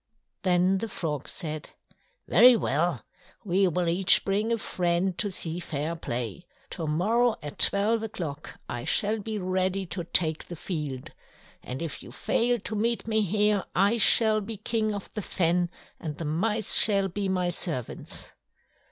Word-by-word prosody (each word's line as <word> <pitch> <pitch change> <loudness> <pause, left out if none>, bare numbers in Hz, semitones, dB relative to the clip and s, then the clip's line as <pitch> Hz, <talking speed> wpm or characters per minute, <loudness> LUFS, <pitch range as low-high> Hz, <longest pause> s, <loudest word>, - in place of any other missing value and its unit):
Then 185 +1 +2
the 225 - -3
Frog 150 - -4
said: 155 -3 -6 0.5
"Very 250 0 +7
well! 155 - -1 0.4
We 195 0 +2
will 175 0 -1
each 180 +3 +4
bring 210 +4 0
a 230 - +1
friend 180 -2 -1
to 205 -3 0
see 170 -2 -2
fair 155 0 -4
play. 125 +3 -5 0.2
To 165 -4 -4
morrow 220 +10 +1
at 145 - -8
twelve 215 +3 +3
o'clock 160 -9 -6
I 120 0 -5
shall 215 - +1
be 215 +1 -4
ready 185 0 -1
to 175 0 -4
take 160 -2 +1
the 175 - -8
field; 150 -7 -5 0.5
and 130 +6 -6
if 165 - -5
you - - -12
fail 245 +1 0
to 215 - -4
meet 230 +2 -1
me 220 -1 +2
here 210 0 +1
I 200 +4 +3
shall 215 0 +6
be 210 +2 -6
King 215 +1 -1
of 205 -2 -7
the 210 - -4
Fen, 175 -2 0 0.3
and 150 -3 -6
the 165 - -5
mice 210 +8 0
shall 200 -3 +6
be 195 +1 -3
my 180 -2 0
servants." 160 -8 -2
185 Hz, 160 wpm, -26 LUFS, 165-210 Hz, 0.5 s, Very